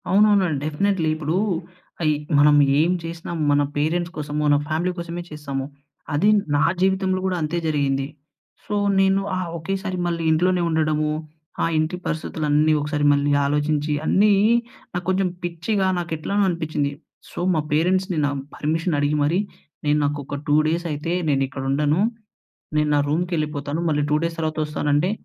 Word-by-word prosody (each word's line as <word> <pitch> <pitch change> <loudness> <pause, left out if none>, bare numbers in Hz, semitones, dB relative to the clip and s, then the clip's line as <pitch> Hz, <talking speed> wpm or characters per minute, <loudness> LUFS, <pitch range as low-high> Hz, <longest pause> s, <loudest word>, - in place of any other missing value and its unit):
అవునవునండి. 195 -5 +4
డెఫినెట్లీ. 165 +2 0
ఇప్పుడూ, 155 +2 -1 0.6
అయి 155 -2 +3 0.2
మనం 145 +1 +6 0.3
ఏం 170 +3 +2
చేసినా 165 0 -6 0.2
మన 145 0 +4 0.2
పేరెంట్స్ 170 +4 0
కోసమో, 150 0 -3
మన 145 - +5
ఫ్యామిలీ 160 +4 0
కోసమే 170 0 -5
చేస్తాము. 140 -3 -4 0.5
అది 160 +9 +3 0.3
నా 145 - +3 0.2
జీవితంలో 190 0 +2
గూడా 185 -1 0
అంతే 155 +3 -1
జరిగింది. 140 -3 0 0.6
సో, 210 - -3 0.2
నేను 195 0 +3 0.2
ఆ - - -1 0.2
ఒకేసారి 190 +2 -3
మళ్ళీ 170 -1 -2
ఇంట్లోనే 180 +3 +2
ఉండడము, 155 -1 +1 0.5
ఆ - - +3
ఇంటి 155 +3 0
పరిస్థితులన్నీ 155 -1 +1
ఒకసారి 150 0 -1
మళ్ళీ 145 0 +1
ఆలోచించి, 150 +1 0
అన్నీ 205 +4 +4 0.6
నాకు 175 0 -3
కొంచెం 190 0 +1
పిచ్చిగా 175 +4 -1
నాకెట్లనో 170 +4 -1
అనిపిచ్చింది. 155 -4 -1 0.4
సో, - - -7 0.2
మా 155 - +2
పేరెంట్స్‌ని 180 +3 +1
నా 145 - 0 0.2
పర్మిషన్ 160 +1 -1
అడిగి 145 +1 +1
మరీ, 165 +6 +2 0.5
నేను 145 0 +3
నాకొక 145 0 -3
2 145 - +4
డేసయితే 165 -1 -2 0.2
నేనిక్కడుండను, 140 +3 0 0.8
నేను 150 0 +2
నా - - +3
రూమ్‌కెళ్ళిపోతాను. 155 -2 -1
మళ్ళీ 150 -1 +1
2 - - +4
డేస్ 165 0 -2
తర్వాతొస్తానంటే 155 +1 0
155 Hz, 140 wpm, -22 LUFS, 150-175 Hz, 0.8 s, మనం